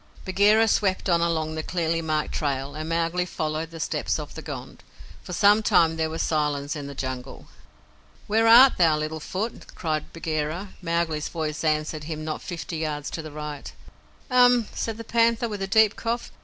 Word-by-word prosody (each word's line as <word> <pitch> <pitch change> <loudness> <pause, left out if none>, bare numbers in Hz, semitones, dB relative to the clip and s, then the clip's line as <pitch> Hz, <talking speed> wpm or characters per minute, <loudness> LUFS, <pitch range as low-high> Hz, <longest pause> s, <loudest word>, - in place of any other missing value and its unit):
Bagheera 205 +4 +4
swept 195 -3 +1
on 170 -1 +3
along 160 -2 0
the 160 - -3
clearly 165 0 -1
marked 155 -2 -1
trail, 140 -2 -2
and 155 +1 -5
Mowgli 165 +2 0
followed 155 0 -3
the 165 0 -10
steps - - -1
of - - -7
the - - -7
Gond. - - -8 0.4
For 185 - -10
some 205 +4 +5
time 165 -6 +3
there 160 0 -1
was 160 +1 -2
silence 150 -1 -1
in 145 -2 -6
the 140 - -8
Jungle. 130 -1 -6 0.8
"Where 225 +2 +2
art 245 +4 +8
thou, 160 -3 +4
Little 155 +1 -3
Foot?" 200 +9 -5
cried 155 -3 -3
Bagheera. 160 +3 -3
Mowgli's 165 -3 -1
voice 155 -2 -3
answered 155 -1 -1
him 155 -1 -5
not 155 -1 -4
fifty 170 -1 -5
yards 150 -2 -3
to 165 - -4
the 155 -1 -9
right. 150 -1 -7 0.6
"Um!" 245 -2 +5
said 225 -1 -3
the 230 - -7
Panther, 230 +1 +2
with 205 -3 -5
a 195 - -1
deep 220 +1 +4
cough. 235 +1 -3
165 Hz, 185 wpm, -25 LUFS, 155-200 Hz, 0.8 s, art